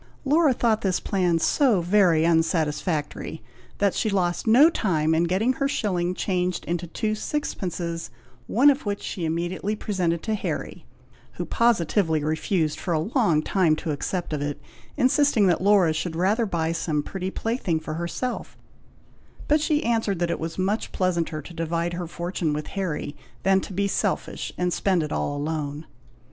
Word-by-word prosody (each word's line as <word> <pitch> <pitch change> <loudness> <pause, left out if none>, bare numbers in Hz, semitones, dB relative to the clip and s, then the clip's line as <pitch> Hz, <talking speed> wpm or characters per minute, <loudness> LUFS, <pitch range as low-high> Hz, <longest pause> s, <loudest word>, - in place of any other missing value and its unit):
Laura 300 +1 +4
thought 230 -3 +1
this 190 -4 +1
plan 180 -4 +1
so 235 - +3
very 175 -3 +3
unsatisfactory, 160 -1 0 0.3
that 200 -2 +2
she 220 - 0
lost 180 0 0
no 250 +8 +7
time 160 - +1
in 165 +2 +3
getting 195 +9 +1
her 275 0 0
shilling 185 -9 -1
changed 180 -2 -1
into 175 0 -2
two 215 +6 -2
sixpences, 175 - -3 0.4
one 275 +6 +5
of 275 - -3
which 205 -1 -3
she 175 - -3
immediately 175 +5 -2
presented 180 -6 -1
to 220 - -1
Harry, 210 - -4 0.5
who - - -4
positively 175 -8 +2
refused 155 +1 0
for 175 - -1
a 160 +8 -2
long 170 - +3
time 175 -4 +2
to 155 0 -4
accept 170 +3 -3
of 150 - -2
it, 145 0 -3 0.4
insisting 260 -4 +3
that 175 -2 +2
Laura 195 -5 +4
should 160 +1 -3
rather 205 +7 +1
buy 165 -3 -1
some 160 -3 -1
pretty 190 +2 -4
plaything 210 -6 -1
for 155 0 -6
herself; 170 +10 -4 0.9
but 300 0 +3
she 305 -1 +1
answered 225 -4 +1
that 170 0 0
it - - -2
was 165 0 -5
much 195 +4 -1
pleasanter 170 -4 -1
to 175 - -11
divide 165 +1 -2
her 175 0 -4
fortune 170 -2 -2
with 150 0 -3
Harry, 170 -6 -3 0.3
than 195 0 +4
to - - -8
be 200 +2 0
selfish, - - -2
and 180 -1 0
spend 185 -4 +1
it 150 - -5
all 145 - -1
alone. 150 0 -3
180 Hz, 165 wpm, -25 LUFS, 165-210 Hz, 0.9 s, no